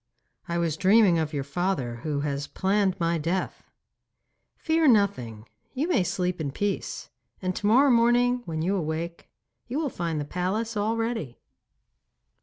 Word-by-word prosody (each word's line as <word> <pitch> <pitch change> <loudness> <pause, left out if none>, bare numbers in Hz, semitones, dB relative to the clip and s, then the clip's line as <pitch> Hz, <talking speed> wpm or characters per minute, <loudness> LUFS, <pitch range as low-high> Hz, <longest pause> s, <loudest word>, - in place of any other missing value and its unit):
'I 170 -1 -2
was 165 -3 0
dreaming 190 -2 +5
of 155 -1 -1
your 145 -3 -2
father, 140 -5 -2
who 145 +3 -3
has 145 0 -2
planned 195 -1 0
my 170 0 +1
death.' 175 +4 -3 0.9
'Fear 320 -1 +2
nothing. 155 - +2 0.3
You 285 +5 0
may 255 - +3
sleep 180 -1 -2
in 145 - -2
peace, 205 +7 -3 0.3
and 185 -1 -2
to 205 - -1
morrow 265 +6 +5
morning 245 +1 +3
when 160 -1 -3
you 190 +4 +1
awake 165 0 -4 0.4
you 250 - -3
will 305 -2 0
find 170 -7 -3
the 145 - -3
palace 195 +8 -2
all 215 +2 0
ready. 225 - -3
185 Hz, 155 wpm, -26 LUFS, 160-225 Hz, 0.9 s, dreaming